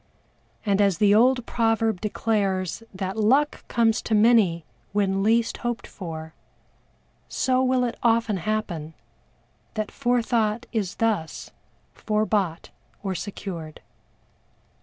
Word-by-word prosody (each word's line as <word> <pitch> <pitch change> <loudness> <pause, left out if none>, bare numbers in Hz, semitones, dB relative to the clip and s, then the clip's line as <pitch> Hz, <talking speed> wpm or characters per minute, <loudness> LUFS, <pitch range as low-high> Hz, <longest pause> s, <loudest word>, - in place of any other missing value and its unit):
And 200 -1 +2
as 195 -4 +3
the 205 +1 +4
old 250 +2 +4
proverb 225 -4 +1
declares 200 -4 -1
that 190 +1 -4
luck 270 +8 +2
comes 225 -2 +2
to 220 - 0
many 210 -7 +4 0.3
when 195 -1 +1
least 230 +3 +2
hoped 240 -1 -3
for, 160 -4 -8 1.0
so 255 0 +1
will 255 -1 +2
it 240 -1 -3
often 230 -3 +2
happen 175 -5 -3 0.8
that 215 -1 -3
forethought 235 -3 0
is 200 -5 -1
thus 210 -8 -2 0.4
fore 215 0 0
bought 190 -7 -1 0.3
or 195 -2 -1
secured. 175 -4 -6
215 Hz, 115 wpm, -25 LUFS, 190-230 Hz, 1.0 s, the